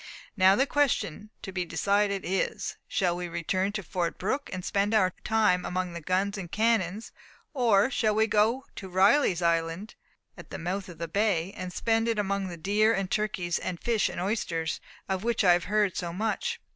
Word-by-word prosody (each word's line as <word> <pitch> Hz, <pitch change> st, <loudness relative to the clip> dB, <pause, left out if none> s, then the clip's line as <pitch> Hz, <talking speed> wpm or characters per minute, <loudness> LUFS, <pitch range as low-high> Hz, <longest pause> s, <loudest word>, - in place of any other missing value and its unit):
Now 190 Hz, -1 st, +6 dB
the 265 Hz, -, +3 dB
question 255 Hz, -, 0 dB
to 190 Hz, -, -5 dB
be 180 Hz, -1 st, -2 dB
decided 200 Hz, +2 st, 0 dB
is, 190 Hz, +2 st, -2 dB
Shall 180 Hz, -3 st, 0 dB
we 175 Hz, 0 st, -4 dB
return 185 Hz, +4 st, -1 dB
to 210 Hz, -2 st, -3 dB
Fort 175 Hz, -1 st, -2 dB
Brooke, 265 Hz, +9 st, -2 dB
and 185 Hz, -1 st, -5 dB
spend 205 Hz, +2 st, +1 dB
our 185 Hz, -4 st, +3 dB
time 215 Hz, -5 st, +2 dB
among 180 Hz, -1 st, -2 dB
the 170 Hz, -, -6 dB
guns 195 Hz, +4 st, 0 dB
and 175 Hz, -3 st, -7 dB
cannons; 215 Hz, -2 st, 0 dB, 0.4 s
or 240 Hz, -3 st, +3 dB
shall 215 Hz, -4 st, +1 dB
we 220 Hz, +1 st, +4 dB
go 220 Hz, +4 st, +2 dB
to 190 Hz, -, -7 dB
Riley's 190 Hz, -, +3 dB
Island 165 Hz, +4 st, 0 dB, 0.4 s
at -, -, -12 dB
the -, -, -6 dB
mouth 185 Hz, +3 st, -4 dB
of 170 Hz, -, -10 dB
the 170 Hz, +1 st, -4 dB
bay, 195 Hz, -1 st, 0 dB
and 185 Hz, -1 st, -5 dB
spend 225 Hz, +4 st, +1 dB
it 230 Hz, -1 st, 0 dB
among 200 Hz, -1 st, -1 dB
the 175 Hz, -2 st, -7 dB
deer 210 Hz, +6 st, +2 dB
and 195 Hz, -1 st, -3 dB
turkeys, 185 Hz, -5 st, -1 dB
the 180 Hz, -2 st, -3 dB
fish 230 Hz, -3 st, +1 dB
and -, -, -6 dB
oysters, 175 Hz, -4 st, -2 dB, 0.3 s
of 190 Hz, 0 st, -2 dB
which 235 Hz, -1 st, +1 dB
we 185 Hz, -, +5 dB
have 175 Hz, 0 st, +4 dB
heard 210 Hz, -2 st, +1 dB
so 175 Hz, -2 st, -3 dB
much? 225 Hz, -, -2 dB
195 Hz, 195 wpm, -28 LUFS, 180-215 Hz, 0.4 s, Now